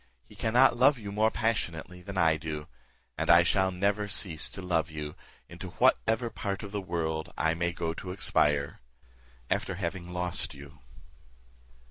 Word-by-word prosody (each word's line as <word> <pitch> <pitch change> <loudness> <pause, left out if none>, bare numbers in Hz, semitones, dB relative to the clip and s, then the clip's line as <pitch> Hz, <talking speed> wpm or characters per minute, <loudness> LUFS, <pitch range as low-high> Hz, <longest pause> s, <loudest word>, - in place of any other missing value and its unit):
He - - -16
cannot 120 +3 +4
love 130 +3 +5
you 105 -3 -7
more 110 +2 +2
passionately 90 -7 -2
than 100 +1 -7
I 80 -3 +4
do; 75 -1 -5 0.5
and - - -2
I 85 +1 +8
shall 95 +2 +2
never 100 +3 0
cease 90 -6 +2
to - - -8
love 85 -4 0
you 75 -1 -6 0.3
into - - -9
whatever 115 +1 +2
part 100 0 -4
of 100 - -7
the 100 -1 -3
world 80 -3 -3
I 80 0 +2
may 85 +1 -1
go 85 -1 -3
to 90 - -8
expire, 75 -7 +1 0.7
after 95 - -1
having 90 -1 -4
lost 90 -1 -1
you." 70 +2 -13
90 Hz, 160 wpm, -29 LUFS, 80-100 Hz, 0.7 s, I